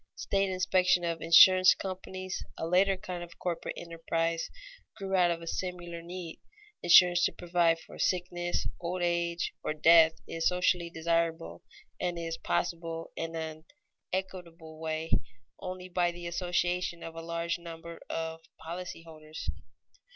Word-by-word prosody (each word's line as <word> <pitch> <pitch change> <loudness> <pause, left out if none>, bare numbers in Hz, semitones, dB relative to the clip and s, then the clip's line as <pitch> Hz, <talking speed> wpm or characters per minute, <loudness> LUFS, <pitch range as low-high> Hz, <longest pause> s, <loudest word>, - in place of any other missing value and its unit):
State 195 0 0
inspection 185 -1 +2
of 165 -1 -2
insurance 185 +3 +8
companies, 185 0 -5
a - - -3
later 190 +3 +3
kind 180 -3 -6
of 170 0 -12
corporate 175 -2 -3
enterprise, 165 0 -2 0.5
grew 195 -2 -5
out 180 -2 +5
of 170 -1 -2
a - - -7
similar 175 -1 -4
need. 175 -1 -7 0.4
Insurance 175 0 +7
to - - +3
provide 170 -1 +2
for 165 - -13
sickness, 175 -1 0
old 175 +1 -3
age, 170 0 0
or 155 - -2
death 160 +1 +7
is 165 0 0
socially 180 -1 +1
desirable 165 - -1 0.4
and 175 -1 -1
is 165 -1 -3
possible 165 -1 -2
in 165 0 -4
an 160 -1 -5 0.5
equitable 170 -4 -5
way 160 0 -3 0.5
only 185 0 -6
by 175 -1 +1
the 175 0 -9
association 175 0 -1
of 165 - -7
a 165 - -7
large 170 +1 -2
number 170 0 -9
of 160 0 -3 0.2
policy 170 +1 -7
holders. 155 -1 -7
170 Hz, 140 wpm, -30 LUFS, 165-180 Hz, 0.5 s, insurance